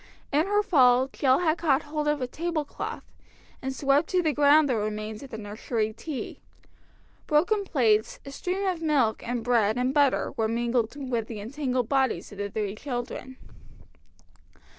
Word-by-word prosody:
In 305 Hz, +5 st, +2 dB
her 415 Hz, +1 st, +2 dB
fall 260 Hz, -8 st, +4 dB
Jill 265 Hz, -1 st, +2 dB
had 325 Hz, -1 st, +1 dB
caught 300 Hz, -3 st, +2 dB
hold 300 Hz, 0 st, -3 dB
of 295 Hz, -3 st, +1 dB
a -, -, -2 dB
tablecloth, 315 Hz, +1 st, -4 dB, 0.6 s
and 265 Hz, -, -3 dB
swept 280 Hz, +3 st, +1 dB
to 365 Hz, -1 st, +2 dB
the 310 Hz, -2 st, +1 dB
ground 290 Hz, +1 st, +5 dB
the 255 Hz, -, +1 dB
remains 215 Hz, 0 st, -3 dB
of 275 Hz, -, -10 dB
the 220 Hz, -, -7 dB
nursery 215 Hz, +1 st, -3 dB
tea. 270 Hz, +4 st, -6 dB, 0.9 s
Broken 365 Hz, +7 st, +2 dB
plates, 225 Hz, -, +1 dB
a 275 Hz, -, -8 dB
stream 370 Hz, +7 st, -3 dB
of 365 Hz, -3 st, -1 dB
milk, 280 Hz, -9 st, +1 dB
and 240 Hz, -1 st, -3 dB
bread 225 Hz, -2 st, +2 dB
and 250 Hz, +1 st, 0 dB
butter 285 Hz, -2 st, +2 dB
were 225 Hz, -4 st, +1 dB
mingled 235 Hz, +1 st, 0 dB
with 250 Hz, -6 st, -3 dB
the 220 Hz, -3 st, -6 dB
entangled 250 Hz, +1 st, -2 dB
bodies 265 Hz, -3 st, 0 dB
of 205 Hz, -, -11 dB
the 205 Hz, 0 st, -2 dB
three 205 Hz, -1 st, -3 dB
children. 255 Hz, +1 st, -6 dB
260 Hz, 165 wpm, -26 LUFS, 230-300 Hz, 0.9 s, ground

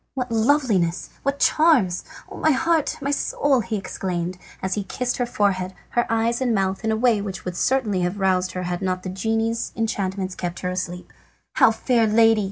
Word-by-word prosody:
"What 250 Hz, -2 st, -3 dB
loveliness! 220 Hz, -, +1 dB
What 275 Hz, 0 st, -1 dB
charms! 270 Hz, -, +3 dB, 0.2 s
Oh, -, -, -10 dB
my 315 Hz, -, +2 dB
heart, 315 Hz, +2 st, +1 dB
my 280 Hz, -, 0 dB
soul!" 280 Hz, -1 st, +1 dB
he 220 Hz, 0 st, -3 dB
exclaimed, 180 Hz, -2 st, -4 dB, 0.2 s
as 190 Hz, 0 st, -2 dB
he 205 Hz, -, -1 dB
kissed 245 Hz, +6 st, -2 dB
her 245 Hz, -, 0 dB
forehead, 190 Hz, -5 st, 0 dB
her 240 Hz, -, 0 dB
eyes 230 Hz, +2 st, +1 dB
and 245 Hz, -3 st, +1 dB
mouth 195 Hz, +1 st, -1 dB
in 220 Hz, -, +1 dB
a 220 Hz, -, +1 dB
way 230 Hz, -3 st, +3 dB
which 195 Hz, -2 st, -6 dB
would 180 Hz, -1 st, -4 dB
certainly 220 Hz, -5 st, +1 dB
have 180 Hz, +3 st, -2 dB
roused 185 Hz, -1 st, +1 dB
her 185 Hz, -, -3 dB
had 175 Hz, 0 st, -3 dB
not 185 Hz, -1 st, -2 dB
the 185 Hz, -, -4 dB
genie's 225 Hz, +4 st, -1 dB
enchantments 195 Hz, -4 st, -2 dB
kept 175 Hz, -1 st, -5 dB
her 180 Hz, -, -2 dB
asleep. 180 Hz, -1 st, -5 dB, 0.4 s
"How, 260 Hz, -4 st, +6 dB
fair 225 Hz, +1 st, +1 dB
lady!" 225 Hz, 0 st, +5 dB
210 Hz, 190 wpm, -23 LUFS, 185-240 Hz, 0.4 s, How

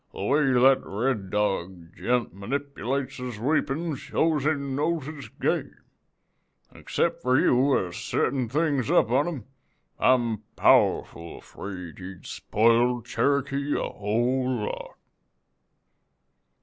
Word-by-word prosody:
'The -, -, -6 dB
way 140 Hz, +4 st, +2 dB
that 130 Hz, +2 st, +5 dB
Red 105 Hz, -1 st, -2 dB
Dog 95 Hz, -4 st, -2 dB
gent 120 Hz, -6 st, -1 dB
manipulates 135 Hz, +4 st, -3 dB
his 125 Hz, -3 st, -6 dB
weepon 150 Hz, +4 st, 0 dB
shows 150 Hz, +2 st, 0 dB
he 155 Hz, +1 st, +3 dB
knows 140 Hz, +3 st, -2 dB
his 145 Hz, -5 st, -8 dB
game; -, -, -2 dB, 1.0 s
an' -, -, -15 dB
except -, -, -1 dB
for 130 Hz, +1 st, +3 dB
you 130 Hz, +2 st, +3 dB
a 90 Hz, -1 st, -3 dB
settin' 125 Hz, +5 st, -1 dB
things 145 Hz, -3 st, 0 dB
up 110 Hz, -, +3 dB
on 140 Hz, +5 st, +3 dB
him, 145 Hz, -11 st, -5 dB, 0.5 s
I'm 120 Hz, -4 st, +3 dB, 0.2 s
powerful 85 Hz, 0 st, +2 dB
afraid 90 Hz, -5 st, -9 dB
he'd 95 Hz, -1 st, -10 dB
spoiled 115 Hz, +2 st, +2 dB
Cherokee 140 Hz, +2 st, 0 dB
a -, -, -2 dB
whole 125 Hz, +5 st, 0 dB
lot.' -, -, -6 dB
125 Hz, 120 wpm, -26 LUFS, 105-140 Hz, 1.0 s, that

